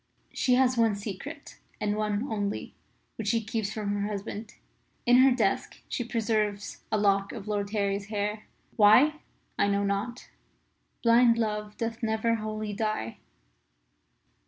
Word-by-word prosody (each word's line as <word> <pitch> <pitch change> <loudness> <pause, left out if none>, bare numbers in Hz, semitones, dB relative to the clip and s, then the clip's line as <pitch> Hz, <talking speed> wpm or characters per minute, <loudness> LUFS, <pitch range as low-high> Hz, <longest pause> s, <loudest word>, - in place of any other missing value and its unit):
She 250 -2 +2
has 255 -1 +3
one 225 -3 +3
secret 200 -1 -8 0.2
and 210 -1 0
only 210 0 -1
one 205 -5 -3 0.5
which 220 - -4
she 230 +3 +3
keeps 220 -1 -3
from 210 -2 -2
her 205 0 -1
husband. 210 +1 -6 0.5
In 245 0 +6
her 260 +1 +7
desk 255 - 0
she 245 - -2
preserves 215 -3 -1
a 215 - +2
lock 200 -1 +2
of 215 -3 -8
Lord 205 -1 -1
Harry's 200 -1 -1
hair. 210 0 -3 0.3
Why? 250 +9 +6 0.4
I - - +4
know 200 0 +1
not. 200 +5 -3 0.7
Blind 235 0 +5
Love 210 -2 -2
doth 230 0 -3
never 220 0 +1
wholly 215 -1 -3
die. 215 - -2
215 Hz, 140 wpm, -28 LUFS, 205-230 Hz, 0.7 s, her